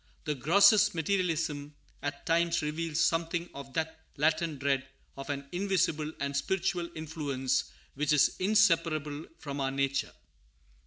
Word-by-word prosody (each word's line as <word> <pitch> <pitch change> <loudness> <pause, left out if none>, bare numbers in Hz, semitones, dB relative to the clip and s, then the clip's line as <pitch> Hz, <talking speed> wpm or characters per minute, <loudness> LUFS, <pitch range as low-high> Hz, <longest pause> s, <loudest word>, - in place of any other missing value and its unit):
The 150 - -1
grossest 190 - +5
materialism, 160 -4 -1 0.3
at 145 0 -5
times, 170 0 +2
reveals 155 +1 -2
something 170 +1 +1
of 135 -1 -9
that 160 0 -2 0.2
latent 155 +1 +1
dread 135 -1 0 0.3
of 135 +2 -8
an 140 -1 -3
invisible 175 -5 0
and 140 0 -2
spiritual 175 +3 -1
influence 140 -4 -1 0.3
which 150 +2 0
is 150 -2 +4
inseparable 165 -7 +2
from 140 -1 -6
our 135 - +1
nature. 140 0 -1
155 Hz, 125 wpm, -30 LUFS, 140-170 Hz, 0.3 s, grossest